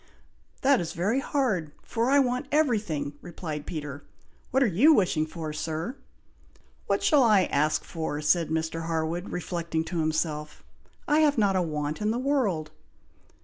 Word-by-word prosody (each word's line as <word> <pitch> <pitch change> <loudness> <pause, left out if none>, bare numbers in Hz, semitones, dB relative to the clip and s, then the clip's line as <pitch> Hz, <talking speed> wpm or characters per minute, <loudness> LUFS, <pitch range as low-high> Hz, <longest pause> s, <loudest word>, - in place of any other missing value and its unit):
"That 270 -4 +4
is 165 -1 -4
very 200 +10 +1
hard, 215 - -1
for 235 +2 -1
I 280 - +5
want 250 -1 +1
everything," 210 - +1
replied 160 -4 -6
Peter. 145 -3 -6 0.5
"What 265 +2 +3
are - - +4
you 240 - +5
wishing 165 - +1
for, 155 -1 -6
Sir?" 160 - -3 0.9
"What - - 0
shall 295 -4 +5
I 215 -6 +5
ask 155 -1 +1
for?" 160 -3 -4
said 155 +2 +2
Mr. 160 +1 -2
Harwood, 165 +2 -2
reflecting 170 -2 -2
to 170 +1 -4
himself. 155 -1 -2 0.4
"I 300 0 +4
have 295 -3 +3
not 200 -3 +3
a 185 - +3
want 150 0 -3
in 210 - +1
the 225 - 0
world?" 245 - 0
170 Hz, 155 wpm, -27 LUFS, 155-240 Hz, 0.9 s, I